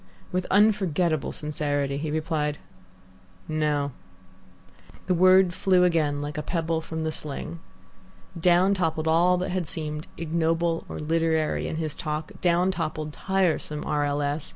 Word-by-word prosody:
With 180 0 -1
unforgettable 185 -7 +2
sincerity 145 -2 -2
he 150 +2 -3
replied, 155 -1 -1 0.9
"No." 150 -2 0 1.1
The 185 - +1
word 185 0 +5
flew 185 -1 +3
again 155 -5 +1
like 150 +2 -4
a - - -1
pebble 165 -1 -1
from 160 0 -5
the 160 - -1
sling. 155 +3 -5 0.8
Down 180 +3 +4
toppled 160 -4 -1
all 175 +3 +4
that 180 - -2
had 180 -3 -1
seemed 150 0 -4
ignoble 165 +1 0
or - - -5
literary 160 0 0
in - - -3
his 155 -2 -2
talk, 155 0 -4
down 180 +1 +3
toppled 155 -3 -3
tiresome 175 -6 0
R. 150 -1 0
L. 145 0 0
S. 145 +1 -2
160 Hz, 140 wpm, -26 LUFS, 150-175 Hz, 1.1 s, word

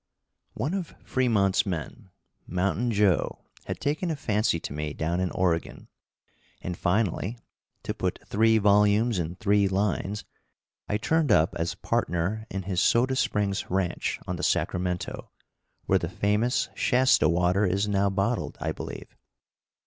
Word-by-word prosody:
One 135 +10 -2
of 190 -4 -4
Fremont's 110 -7 +2
men, 95 +4 -5 0.4
Mountain 100 +7 0
Joe, 100 -7 +1 0.2
had - - -4
taken 150 +5 -1
a 160 - -1
fancy 105 - 0
to 70 - -6
me 75 0 -3
down 85 +2 -1
in 90 0 0
Oregon, 85 -2 -1 0.7
and 90 - -4
finally, 100 +4 0 0.5
to - - -3
put - - -2
three 110 +2 +3
volumes 105 +1 +3
in 85 +1 -3
three 100 0 +2
lines, 100 +1 -1 0.6
I 105 - +1
turned 155 +4 +1
up 80 -4 +4
as 85 0 -2
partner 95 +6 -1
in 95 0 -4
his 90 -1 -1
Soda 125 +5 +3
Springs 105 -6 0
ranch 90 -2 -1
on - - -3
the - - -5
Sacramento, 90 0 -1 0.6
where 95 - +3
the 85 - -3
famous 105 +6 +1
Shasta 130 +1 +3
water 90 +3 +2
is 100 +2 +1
now 100 -1 +2
bottled, 100 +4 -1
I - - -2
believe. - - -8
100 Hz, 140 wpm, -27 LUFS, 90-110 Hz, 0.7 s, up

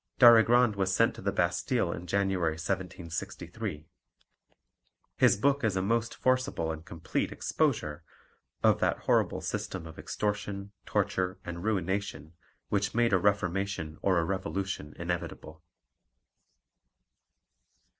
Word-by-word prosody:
Darigrand 120 -1 +7
was 95 -1 +1
sent - - +3
to - - -10
the - - 0
Bastille 90 +4 +1
in 85 +1 -6
January 95 -3 +1
1763. 90 +1 -4 1.3
His - - +4
book 140 +6 +2
is 110 -4 +1
a 95 - +1
most 115 +3 0
forcible 130 -11 +1
and 80 0 -6
complete 85 0 -3
exposure 75 +2 -1 0.6
of - - +5
that - - +1
horrible - - +2
system - - -4
of 80 - -10
extortion, 100 -1 -3 0.2
torture, 95 0 0
and 85 0 -6
ruination 95 -6 -2 0.4
which 100 0 0
made 120 -2 +3
a 95 - +5
reformation 95 -4 0
or 95 -2 +3
a 85 - +2
revolution 95 -4 -3
inevitable. 85 -2 -5
95 Hz, 115 wpm, -30 LUFS, 85-105 Hz, 1.3 s, Darigrand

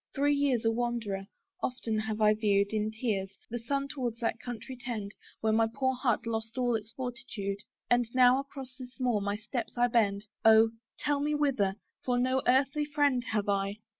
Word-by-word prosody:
Three 285 +1 +3
years 275 -5 +1
a 225 - +4
wanderer, 225 -5 -2 0.3
often 230 -4 -1
have 220 0 -3
I 210 0 +6
view'd, 205 -1 +2
In 215 0 +1
tears, 210 -4 -2
the 240 - -2
sun 275 +4 -1
towards 255 -6 -3
that 230 -1 -1
country 245 +1 -6
tend 230 -5 -5 0.3
Where 220 -1 +2
my 225 0 +4
poor 260 +1 +1
heart 250 -4 0
lost 225 +1 -3
all 245 -1 +2
its 220 -1 -2
fortitude: 235 -6 -4 0.3
And 245 -1 +2
now 255 0 +6
across 270 -2 -8
this 255 0 -10
moor 245 -5 +1
my 200 0 -1
steps 225 +1 -5
I 240 - +5
bend 215 -4 +2 0.2
Oh! 225 0 +7 0.3
tell 290 -1 0
me 295 +1 0
whither 250 -10 +1 0.3
for 245 -1 +1
no 255 +1 +2
earthly 275 +4 +3
friend 290 -4 +2
Have 210 -3 -1
I. 200 0 0
235 Hz, 185 wpm, -30 LUFS, 215-260 Hz, 0.3 s, Oh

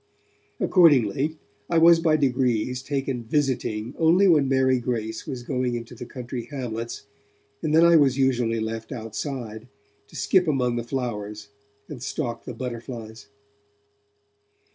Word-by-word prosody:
Accordingly, 150 - +3 0.3
I 170 - +2
was 165 0 +7
by 160 -2 +3
degrees 125 -3 0
taken 135 -3 -3
'visiting' 120 -3 -1
only 170 +5 +5
when 150 -6 +4
Mary 130 -1 +3
Grace 110 -2 -3
was 130 -4 -5
going 125 -1 -1
into 115 0 -7
the 120 0 -9
country 125 -2 -6
hamlets, 120 -4 -5 0.6
and 155 - -1
then 165 +1 +7
I 170 -1 +7
was 135 -3 +3
usually 120 -4 +1
left 110 +2 -4
outside, 115 -1 -5 0.4
to - - -17
skip 185 -3 +2
among 125 -5 +1
the 120 - -2
flowers 105 -5 -4 0.4
and 140 -6 -9
stalk 120 -3 -4
the 125 - -6
butterflies. 115 -3 -7
125 Hz, 135 wpm, -24 LUFS, 115-140 Hz, 0.6 s, was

